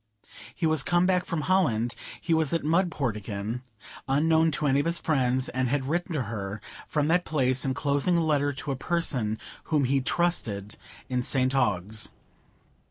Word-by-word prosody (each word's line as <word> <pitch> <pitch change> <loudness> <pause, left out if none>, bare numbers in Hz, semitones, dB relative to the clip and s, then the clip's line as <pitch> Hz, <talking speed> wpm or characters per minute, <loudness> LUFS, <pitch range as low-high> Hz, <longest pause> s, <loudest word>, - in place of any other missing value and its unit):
He - - -1
was 160 -2 +3
come 175 +4 +2
back 180 -1 +2
from 165 -3 -2
Holland; 130 - +1 0.3
he 165 - 0
was 160 -3 +2
at 165 - 0
Mudport 155 - +1
again, 105 +3 -4 0.5
unknown 160 +4 +3
to 150 - -1
any 140 -1 +3
of 145 - 0
his 170 0 +2
friends, 130 -4 +1
and 130 -1 -1
had 135 0 0
written 175 +3 -1
to 145 -5 0
her 105 -2 -5 0.3
from 150 -1 0
that 175 +2 +3
place, 130 -5 +1
enclosing 140 +5 +1
the 170 - +3
letter 145 -3 +2
to 145 +1 -4
a - - -1
person 130 -8 -1 0.3
whom 150 -3 +1
he 135 +1 +2
trusted 115 - -1 0.3
in 125 -1 0
St 130 +1 +1
Ogg's. 110 -4 0
140 Hz, 170 wpm, -27 LUFS, 125-160 Hz, 0.5 s, was